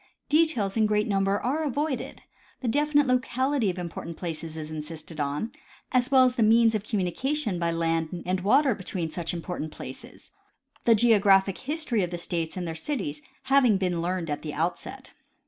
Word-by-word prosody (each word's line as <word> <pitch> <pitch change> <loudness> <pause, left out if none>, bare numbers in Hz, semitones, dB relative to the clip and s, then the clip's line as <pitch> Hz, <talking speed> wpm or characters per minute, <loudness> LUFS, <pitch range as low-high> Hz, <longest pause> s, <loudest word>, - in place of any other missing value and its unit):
Details 300 -11 +2
in 220 -1 +4
great 210 0 +1
number 195 0 +1
are 285 +6 -1
avoided; 290 0 -3 0.4
the 255 - -3
definite 290 +4 +3
locality 255 -1 +1
of 180 - -3
important 170 -1 -6
places 165 -2 -5
is 155 0 -6
insisted 155 +1 -7
on, 145 +10 -2 0.4
as 255 -1 +2
well 265 -2 +6
as 255 -1 +2
the - - +2
means 225 +1 +5
of 215 -2 -1
communication 215 - -1
by 170 -1 0
land 165 -1 0 0.2
and 185 +1 -1
Avater 265 +4 +4
between 180 -4 -4
such 170 0 -3
important 170 -2 -5
places, - - -10 0.5
the 230 - +6
geographic 200 -4 +4
history 285 -5 -1
of 180 - -1
the 175 - -4
states 170 0 -3
and 180 - -3
their 165 - -3
cities 160 - -4 0.2
having 260 -6 +4
been 180 -3 -1
learned 175 -2 -2
at 145 - -3
the 150 -2 -6
outset. 165 +3 -4
195 Hz, 175 wpm, -26 LUFS, 170-255 Hz, 0.5 s, well